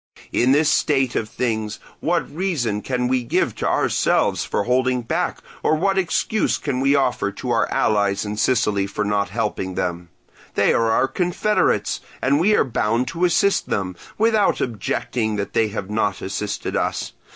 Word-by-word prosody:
"In 125 Hz, +2 st, +3 dB
this 150 Hz, +2 st, +4 dB
state 135 Hz, -5 st, +2 dB
of 110 Hz, -, -1 dB
things 110 Hz, -3 st, -2 dB, 0.2 s
what 170 Hz, -3 st, 0 dB
reason 145 Hz, -, -1 dB
can 125 Hz, 0 st, -1 dB
we 130 Hz, 0 st, +1 dB
give 120 Hz, -, 0 dB
to -, -, -1 dB
ourselves -, -, +1 dB
for -, -, -1 dB
holding 125 Hz, +1 st, +1 dB
back, -, -, -1 dB, 0.2 s
or 155 Hz, -, +2 dB
what 195 Hz, +5 st, +1 dB
excuse 190 Hz, +4 st, 0 dB
can 125 Hz, -, -2 dB
we 135 Hz, +2 st, +3 dB
offer 125 Hz, -7 st, +1 dB
to 125 Hz, +5 st, -4 dB
our 115 Hz, -, +1 dB
allies 100 Hz, -1 st, +1 dB
in 105 Hz, 0 st, -3 dB
Sicily 105 Hz, -4 st, +1 dB
for 105 Hz, +1 st, -3 dB
not 100 Hz, -1 st, 0 dB
helping 95 Hz, -3 st, -2 dB
them? 85 Hz, -1 st, -3 dB, 0.5 s
They -, -, +3 dB
are 115 Hz, -1 st, +2 dB
our 125 Hz, +4 st, +3 dB
confederates, 180 Hz, +6 st, 0 dB, 0.2 s
and 140 Hz, +2 st, +2 dB
we 210 Hz, +6 st, +4 dB
are -, -, +4 dB
bound 120 Hz, -1 st, 0 dB
to 170 Hz, +5 st, 0 dB
assist 195 Hz, +3 st, +2 dB
them, 95 Hz, -2 st, -2 dB, 0.2 s
without 220 Hz, -2 st, +3 dB
objecting 110 Hz, 0 st, -2 dB
that 100 Hz, -1 st, -4 dB
they 110 Hz, -, +3 dB
have 105 Hz, -1 st, -5 dB
not 105 Hz, -3 st, 0 dB
assisted 100 Hz, +2 st, -3 dB
us. -, -, -2 dB
120 Hz, 170 wpm, -21 LUFS, 105-145 Hz, 0.5 s, this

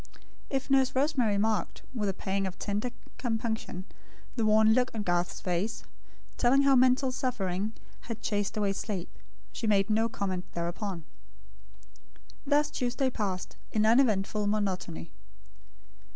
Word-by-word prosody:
If 270 Hz, 0 st, -2 dB
Nurse 265 Hz, -1 st, +4 dB
Rosemary 260 Hz, -7 st, +2 dB
marked, 215 Hz, +1 st, 0 dB
with 210 Hz, -5 st, -1 dB
a -, -, -1 dB
pang 195 Hz, 0 st, -1 dB
of 185 Hz, -, -7 dB
tender 210 Hz, +4 st, -2 dB, 0.3 s
compunction, 220 Hz, -5 st, -2 dB, 0.5 s
the 225 Hz, -3 st, +1 dB
worn 215 Hz, +1 st, +6 dB
look 255 Hz, +2 st, +3 dB
on 215 Hz, -, -2 dB
Garth's 175 Hz, -1 st, 0 dB
face, 180 Hz, +5 st, -2 dB, 0.5 s
telling 265 Hz, +3 st, +4 dB
how 275 Hz, -1 st, +5 dB
mental 255 Hz, +1 st, +4 dB
suffering 215 Hz, -5 st, -2 dB, 0.4 s
had 230 Hz, -1 st, -5 dB
chased 205 Hz, 0 st, -1 dB
away 200 Hz, -2 st, +1 dB
sleep; 195 Hz, -3 st, -4 dB, 0.4 s
she 220 Hz, -, -3 dB
made 200 Hz, 0 st, +3 dB
no 225 Hz, +2 st, +2 dB
comment 190 Hz, -4 st, -3 dB
thereupon. 170 Hz, 0 st, -3 dB, 1.4 s
Thus 295 Hz, +1 st, +3 dB
Tuesday 250 Hz, +1 st, 0 dB
passed, 195 Hz, -6 st, -3 dB
in 215 Hz, 0 st, +2 dB
uneventful 215 Hz, -3 st, +3 dB
monotony. 190 Hz, -, -2 dB
215 Hz, 130 wpm, -29 LUFS, 195-250 Hz, 1.4 s, worn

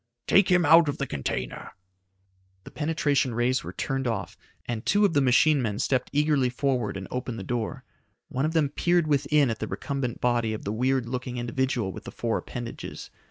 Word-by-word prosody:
"Take 195 Hz, -1 st, +4 dB
him 180 Hz, -2 st, +4 dB
out 160 Hz, +1 st, +7 dB
of 145 Hz, -, -3 dB
the 140 Hz, -, -2 dB
container." 65 Hz, -, -4 dB, 0.9 s
The -, -, -12 dB
penetration 145 Hz, -5 st, 0 dB
rays 125 Hz, +2 st, +1 dB
were -, -, -6 dB
turned 135 Hz, -2 st, -2 dB
off, 115 Hz, -, -3 dB, 0.3 s
and 115 Hz, -2 st, -4 dB
two 205 Hz, +1 st, +3 dB
of 190 Hz, -, +1 dB
the 145 Hz, -, +3 dB
machine 140 Hz, +3 st, +4 dB
men 105 Hz, -4 st, -2 dB
stepped 130 Hz, +2 st, 0 dB
eagerly 145 Hz, -3 st, +2 dB
forward 125 Hz, -5 st, -1 dB
and 95 Hz, -, -7 dB
opened 125 Hz, -2 st, -4 dB
the 95 Hz, -, -5 dB
door. 120 Hz, +5 st, -3 dB, 0.4 s
One 130 Hz, -, -2 dB
of 160 Hz, -, -1 dB
them 155 Hz, -4 st, +2 dB
peered 175 Hz, +3 st, +2 dB
within 145 Hz, -2 st, +2 dB
at 115 Hz, -, -5 dB
the -, -, -3 dB
recumbent 135 Hz, -4 st, -3 dB
body 120 Hz, -2 st, +1 dB
of -, -, -9 dB
the 100 Hz, -, -2 dB
weird 130 Hz, +1 st, +1 dB
looking 125 Hz, 0 st, -4 dB
individual 120 Hz, -3 st, -1 dB
with -, -, -10 dB
the -, -, -7 dB
four 115 Hz, -1 st, -1 dB
appendages. 120 Hz, -1 st, -7 dB
130 Hz, 195 wpm, -26 LUFS, 120-145 Hz, 0.9 s, out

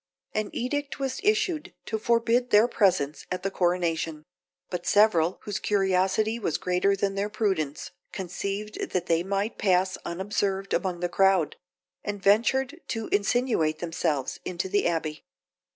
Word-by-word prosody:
An 215 Hz, -1 st, -1 dB
edict 285 Hz, +3 st, -2 dB
was 270 Hz, +2 st, -2 dB
issued 415 Hz, -7 st, 0 dB
to 220 Hz, -, -2 dB
forbid 235 Hz, +2 st, +2 dB
their 210 Hz, +3 st, +6 dB
presence 185 Hz, -, +1 dB
at 180 Hz, -, -3 dB
the 195 Hz, -, -1 dB
coronation; 170 Hz, -4 st, 0 dB, 0.5 s
but 175 Hz, -1 st, -4 dB
several, 190 Hz, -5 st, +4 dB
whose 205 Hz, -1 st, -3 dB
curiosity 195 Hz, +3 st, +1 dB
was 165 Hz, -9 st, -1 dB
greater 180 Hz, +2 st, +1 dB
than 195 Hz, 0 st, 0 dB
their 200 Hz, +1 st, -1 dB
prudence, 190 Hz, -9 st, -1 dB, 0.2 s
conceived 200 Hz, +3 st, -4 dB
that 180 Hz, -1 st, 0 dB
they 165 Hz, -1 st, +2 dB
might 200 Hz, +4 st, -2 dB
pass 185 Hz, -1 st, +2 dB
unobserved 195 Hz, +2 st, -2 dB
among 180 Hz, -3 st, -1 dB
the 175 Hz, -, +1 dB
crowd, 190 Hz, -2 st, +3 dB, 0.5 s
and 205 Hz, 0 st, -3 dB
ventured 265 Hz, -, +2 dB
to 225 Hz, -2 st, -3 dB
insinuate 205 Hz, -7 st, +1 dB
themselves 165 Hz, -5 st, -2 dB
into 180 Hz, +1 st, -3 dB
the 205 Hz, 0 st, +2 dB
abbey. 160 Hz, -3 st, -2 dB
195 Hz, 140 wpm, -27 LUFS, 175-215 Hz, 0.5 s, their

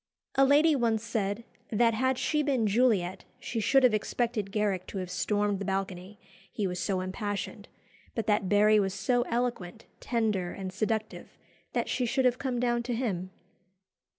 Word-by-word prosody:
A 270 Hz, -, +4 dB
lady 295 Hz, +3 st, +5 dB
once 230 Hz, -4 st, +1 dB
said, 215 Hz, -1 st, -2 dB, 0.3 s
"that 230 Hz, +1 st, +3 dB
had 260 Hz, +3 st, +1 dB
she 300 Hz, +3 st, +1 dB
been 270 Hz, -6 st, +1 dB
Juliet 205 Hz, -5 st, +2 dB, 0.2 s
she 230 Hz, -, -3 dB
should 270 Hz, +5 st, +4 dB
have 250 Hz, -3 st, +5 dB
expected 215 Hz, -1 st, -1 dB
Garrick 200 Hz, -3 st, -1 dB
to -, -, -6 dB
have 185 Hz, -1 st, -4 dB
stormed 205 Hz, -1 st, 0 dB
the 200 Hz, -, -4 dB
balcony, 190 Hz, +1 st, -4 dB, 0.3 s
he 210 Hz, -, -2 dB
was 180 Hz, -1 st, -2 dB
so 190 Hz, -2 st, -1 dB
impassioned; 200 Hz, +2 st, -4 dB, 0.5 s
but 225 Hz, -, -2 dB
that 210 Hz, -3 st, +1 dB
Barry 210 Hz, +1 st, +5 dB
was 195 Hz, -1 st, 0 dB
so 240 Hz, +5 st, +1 dB
eloquent, 235 Hz, -5 st, -2 dB
tender, 215 Hz, -7 st, -1 dB
and 190 Hz, -1 st, -6 dB
seductive, 215 Hz, +2 st, -3 dB, 0.4 s
that -, -, 0 dB
she 250 Hz, -2 st, 0 dB
should 265 Hz, +2 st, +1 dB
have 250 Hz, 0 st, +2 dB
come 260 Hz, -3 st, -2 dB
down 240 Hz, -1 st, +1 dB
to 240 Hz, 0 st, -3 dB
him." 190 Hz, -7 st, -2 dB
215 Hz, 170 wpm, -29 LUFS, 195-245 Hz, 0.5 s, lady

